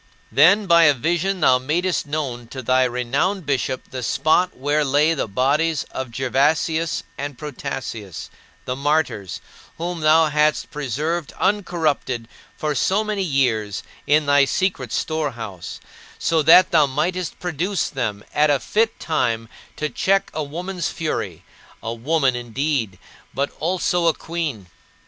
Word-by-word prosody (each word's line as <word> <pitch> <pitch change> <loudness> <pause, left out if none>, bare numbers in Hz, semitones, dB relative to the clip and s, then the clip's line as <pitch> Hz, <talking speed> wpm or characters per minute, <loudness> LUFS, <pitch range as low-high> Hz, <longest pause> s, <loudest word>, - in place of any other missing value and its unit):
16. - - -20
Then 180 +10 +6
by 170 -2 +6
a 145 -2 +5
vision 175 +7 -1
thou 125 0 +5
madest 170 +6 -1
known 135 -6 -3
to 130 +2 -7
thy 130 +2 +3
renowned 130 +10 -1
bishop 130 -2 -2
the 130 - -5
spot 155 +9 +1
where 145 +3 +1
lay 145 +3 +3
the 145 - -2
bodies 145 +8 +1
of 130 -1 -4
Gervasius 150 +6 0 0.2
and 140 -2 -5
Protasius, 115 - -6 0.3
the 125 - -2
martyrs, 140 - -1 0.4
whom 175 +1 -3
thou 155 +1 +5
hadst 150 0 +1
preserved 150 +4 -3
uncorrupted 160 - -1 0.3
for 150 -1 -1
so 190 - +1
many 210 -2 -2
years 120 - 0 0.2
in 150 +1 +4
thy 145 0 +5
secret 140 - -1
storehouse, 120 - -3 0.4
so 165 -1 +1
that 165 +4 +7
thou 155 -4 +5
mightest 170 +6 -2
produce 180 +2 -1
them 105 -6 -3
at 150 0 +3
a 145 -2 +3
fit 220 - 0
time 115 -8 -1 0.3
to 150 - -2
check 195 +5 +1
a 155 - -2
woman's 175 +3 -4
fury 105 - -4 0.4
a 115 - -3
woman 135 +2 +1
indeed, 120 -3 -2 0.4
but 140 +1 -1
also 175 0 +1
a 165 - +3
queen! 160 - -4
150 Hz, 140 wpm, -21 LUFS, 130-165 Hz, 0.4 s, that